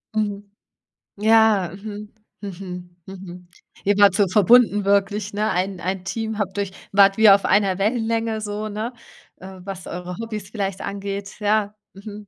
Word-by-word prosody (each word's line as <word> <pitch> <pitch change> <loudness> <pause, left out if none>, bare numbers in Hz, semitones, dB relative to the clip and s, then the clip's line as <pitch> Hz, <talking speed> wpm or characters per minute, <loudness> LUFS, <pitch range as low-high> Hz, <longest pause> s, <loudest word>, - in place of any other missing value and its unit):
Mhm. 205 -2 -2 0.6
Ja, 215 -4 +4
mhm, 205 +1 -8 0.3
mhm, 180 -3 -8
mhm, 180 -2 -10 0.4
eben 205 +1 +2
halt 200 -2 +6
so 200 -1 +3
verbunden, 210 +2 +4
wirklich, 200 +1 +1
ne? 210 +1 0
Ein 185 +1 -2
ein 185 +1 -3
Team, 220 +2 -3
habt 195 -1 -3
euch 200 -2 -2 0.2
wart 195 0 +5
wie 220 -1 +7
auf 195 0 +6
einer 195 -2 +2
Wellenlänge 225 +1 -1
so, 210 0 -4
ne, 215 +4 -4 0.4
äh, 190 0 -11
was 190 -1 -7
eure 180 0 -6
Hobbys 215 -3 -6
vielleicht 195 -3 -3
angeht? 200 0 -5
Ja, 210 0 0 0.2
mhm. 205 +1 -10
200 Hz, 150 wpm, -22 LUFS, 190-215 Hz, 0.6 s, wie